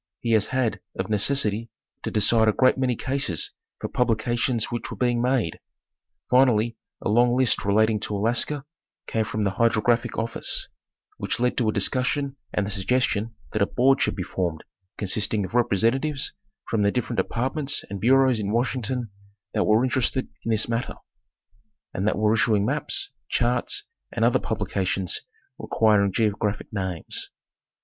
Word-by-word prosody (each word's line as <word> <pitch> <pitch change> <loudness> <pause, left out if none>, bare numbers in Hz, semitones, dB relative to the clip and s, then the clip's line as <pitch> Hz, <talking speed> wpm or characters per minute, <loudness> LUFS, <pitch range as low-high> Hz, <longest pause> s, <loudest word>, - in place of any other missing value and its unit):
He 115 - -2
has 110 -3 +3
had, 130 -3 0 0.2
of - - -3
necessity, 110 0 +1 0.3
to - - -3
decide 110 +1 +3
a 110 - +4
great 130 +3 +4
many 130 -2 0
cases 130 - -1 0.3
for - - -3
publications 120 0 0
which 120 - -3
were - - -7
being 120 -1 +1
made: 125 -9 0 0.7
finally 120 -3 +3 0.3
a - - -1
long 120 +3 +4
list 130 -3 +2
relating 110 +2 +3
to 105 0 -3
Alaska 120 +7 0 0.4
came 110 -1 -1
from 110 0 -2
the 100 - +1
Hydrographic 115 +1 +2
office, 115 +1 -1 0.5
which - - -2
led 125 0 +1
to 115 -3 +2
a - - +3
discussion 130 +6 0 0.2
and 105 - 0
the 100 - -4
suggestion 110 +1 0 0.2
that 110 - -1
a 100 - +4
board 135 +2 +3
should - - +1
be 95 - -3
formed 85 -3 -3 0.3
consisting 105 +1 0
of 95 - -10
representatives 120 +5 +1 0.3
from 110 - 0
the 100 0 +3
different 125 0 -2
departments 135 +4 -1
and 100 -1 -6
bureaus 130 0 +4
in 100 -1 -2
Washington 120 -1 -1 0.4
that - - +1
were 110 +3 +4
interested 130 0 0 0.2
in - - -3
this 110 -1 +1
matter, 115 +1 -2 1.0
and 95 +3 -1
that 105 - +1
were 105 +1 +3
issuing 110 -2 +2
maps, 145 +5 -2 0.2
charts 120 0 0 0.3
and 115 - +1
other 120 - +3
publi 105 -3 -3
cations 95 -2 -1 0.4
requiring 105 -3 +3
geographic 105 0 -1
names. 95 -5 -3
115 Hz, 155 wpm, -25 LUFS, 105-125 Hz, 1.0 s, a